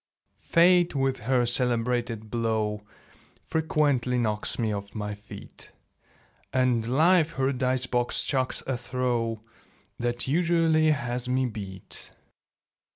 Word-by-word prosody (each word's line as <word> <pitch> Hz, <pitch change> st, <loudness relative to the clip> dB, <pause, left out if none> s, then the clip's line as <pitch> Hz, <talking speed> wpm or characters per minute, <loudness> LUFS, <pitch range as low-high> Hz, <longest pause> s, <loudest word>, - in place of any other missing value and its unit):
Fate 175 Hz, -1 st, +4 dB
with 135 Hz, -1 st, 0 dB
her 125 Hz, +1 st, +1 dB
celebrated 120 Hz, -3 st, 0 dB
blow 110 Hz, -2 st, -1 dB, 0.6 s
Frequently 145 Hz, -6 st, 0 dB
knocks 110 Hz, -3 st, 0 dB
me 110 Hz, -2 st, 0 dB
off 100 Hz, +1 st, -6 dB
my 105 Hz, -1 st, -3 dB
feet; 105 Hz, 0 st, -11 dB, 0.8 s
And 125 Hz, -3 st, +1 dB
Life 160 Hz, +5 st, +3 dB
her 135 Hz, +1 st, 0 dB
dice 130 Hz, 0 st, 0 dB
box 120 Hz, -1 st, +1 dB
chucks 130 Hz, -2 st, -1 dB
a 135 Hz, -2 st, -2 dB
throw 120 Hz, -3 st, -2 dB, 0.6 s
That 120 Hz, +1 st, -1 dB
usually 165 Hz, 0 st, +3 dB
has 125 Hz, -4 st, -1 dB
me 130 Hz, +1 st, +1 dB
beat. 100 Hz, -5 st, -6 dB
125 Hz, 110 wpm, -26 LUFS, 115-135 Hz, 0.8 s, Fate